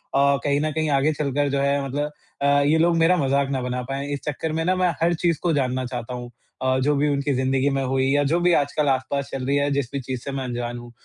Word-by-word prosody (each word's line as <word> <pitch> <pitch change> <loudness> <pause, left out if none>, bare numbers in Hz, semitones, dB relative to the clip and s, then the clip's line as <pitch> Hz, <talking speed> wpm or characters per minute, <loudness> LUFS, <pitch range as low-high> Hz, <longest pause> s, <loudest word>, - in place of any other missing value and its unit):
अ, 140 0 +4
कहीं 140 0 +1
न 155 0 0
कहीं 155 0 -1
आगे 140 +2 +2
चलकर 145 -1 -1
जो 140 0 0
है 140 0 +1
मतलब 145 +3 -2 0.3
अ, - - +1 0.2
ये 155 +3 +3
लोग 170 +1 +3
मेरा 165 +2 +4
मज़ाक 140 -2 +1
ना 135 -2 -1
बना 125 0 -2
पाए 140 +1 -3
इस 140 - -3
चक्कर 150 +2 -2
में 160 +1 -1
ना 185 +1 +2
मैं 185 -1 +2
हर 170 +1 +3
चीज़ 170 -1 0
को 175 -2 +2
जानना 130 -2 0
चाहता 125 -1 -5
हूँ। 120 -1 -7 0.3
अ, 130 0 +2
जो 145 +3 +2
भी 145 +1 +1
उनकी 140 0 0
ज़िंदगी 130 +1 +1
में 135 - 0
हुई 130 0 0
या 145 - +3
जो 170 - +3
भी 175 0 +3
आजकल 145 0 +1
आसपास 135 +1 -1
चल 130 -1 -4
रही 140 +2 +1
है 145 0 +1
जिस 140 -3 -1
भी 140 - -1
चीज़ 130 0 -4
से 140 - -5
मैं 135 -1 -3
अनजान 120 -1 -4
हूँ। 120 0 -10
140 Hz, 270 wpm, -23 LUFS, 130-150 Hz, 0.3 s, अ